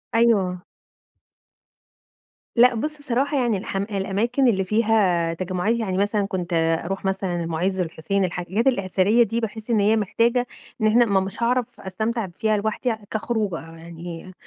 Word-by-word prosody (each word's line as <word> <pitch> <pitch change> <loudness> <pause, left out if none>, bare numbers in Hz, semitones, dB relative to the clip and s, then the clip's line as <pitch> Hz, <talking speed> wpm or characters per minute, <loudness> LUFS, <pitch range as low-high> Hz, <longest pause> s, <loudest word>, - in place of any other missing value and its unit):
أيوه. 195 -6 +2 1.9
لأ 245 +1 +6
بُص 300 +7 -3
بصراحة 280 +1 0
يعني 235 -5 +1
الحم 195 +1 -3
الأماكن 210 +6 0
اللي 195 -5 +2
فيها 195 -5 +2
تجمعات، 185 +5 -1
يعني 190 -5 -2
مثلًا 205 +1 +1
كنت 180 -3 -4 0.3
أروح 195 +3 -4
مثلًا 190 -3 -1
المُعز، 175 +3 -1
الحسين، 180 +3 -1
الحاجات 180 +6 -2
الأثرية 200 -1 +3
دي 230 +1 -2
باحس 220 0 -5
إن 225 -2 +3
هي 210 +2 +4
محتاجة 230 +4 +1 0.3
إن 215 - +4
إحنا 235 +3 +5
ما 200 -3 +2
مش 190 +4 -4
هاعرف 245 0 0
أستمتع 220 +3 -2
فيها 215 +5 0
لوحدي 220 +3 -1 0.2
كخروجة 220 -4 -1
يعني، 165 +2 -9
205 Hz, 140 wpm, -23 LUFS, 185-230 Hz, 1.9 s, لأ